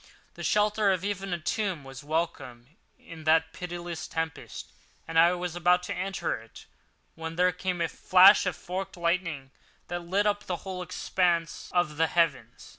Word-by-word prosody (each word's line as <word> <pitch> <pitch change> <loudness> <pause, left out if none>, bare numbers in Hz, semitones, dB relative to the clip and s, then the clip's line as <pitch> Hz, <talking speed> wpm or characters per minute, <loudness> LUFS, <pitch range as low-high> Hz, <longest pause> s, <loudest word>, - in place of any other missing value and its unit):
The - - -10
shelter 210 -1 +2
of 185 0 -1
even 195 -1 -3
a 175 - 0
tomb 180 -1 -2
was 135 +1 -10
welcome 150 -4 -4 0.2
in 160 -1 -12
that 160 0 +3
pitiless 175 -2 -6
tempest, 160 -1 -5 0.4
and 165 0 +2
I 170 +2 +6
was 180 -1 -4
about 180 +1 +3
to - - -3
enter 185 -2 -2
it 115 - -15 0.5
when 160 0 -6
there 180 +1 +3
came 180 0 -3
a 165 - +2
flash 185 +4 +6
of 180 - -1
forked 190 +1 -5
lightning 170 -6 -1 0.4
that 175 0 -2
lit 185 +4 0
up 205 0 0
the 180 - -2
whole 185 -1 -4
expanse 175 -1 -1
of 175 -4 0
the 165 +1 +3
heavens. 150 -9 -1
175 Hz, 170 wpm, -28 LUFS, 160-185 Hz, 0.5 s, I